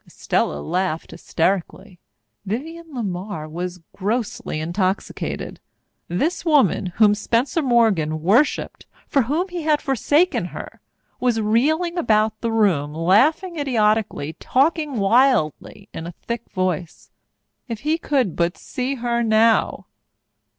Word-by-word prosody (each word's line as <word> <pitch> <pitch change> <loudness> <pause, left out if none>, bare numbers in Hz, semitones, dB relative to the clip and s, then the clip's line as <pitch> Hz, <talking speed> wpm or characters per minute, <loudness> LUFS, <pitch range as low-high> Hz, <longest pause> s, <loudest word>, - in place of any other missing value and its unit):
Estella 75 - -1
laughed 180 - -2
hysterically. 185 +1 -2 0.4
Vivienne 320 - -5
LeMar 195 - -4
was 175 +2 -5
grossly 225 -2 -2
intoxicated. 185 +4 -3 0.5
This 295 - -1
woman 290 - +3
whom 210 -1 +5
Spencer 235 +9 0
Morgan 205 - +2
worshipped, 230 - +1 0.2
for 275 - +2
whom 310 +10 -1
he 355 -1 -4
had 305 -1 +2
forsaken 290 - +1
her, - - -9 0.4
was 245 -3 +1
reeling 310 +11 +1
about 215 -4 +1
the 230 - -1
room, 170 -10 +1
laughing 290 - +2
idiotically, 215 - 0
talking 295 +1 +1
wildly 215 - +2
in 165 - -6
a 175 - -7
thick 235 0 -5
voice. 185 -3 -3 0.6
If 230 -3 -5
he 310 +3 0
could 260 - 0
but 170 +1 0
see 260 +2 -3
her 240 -1 -1
now! 220 -3 +2
225 Hz, 115 wpm, -21 LUFS, 185-275 Hz, 0.6 s, whom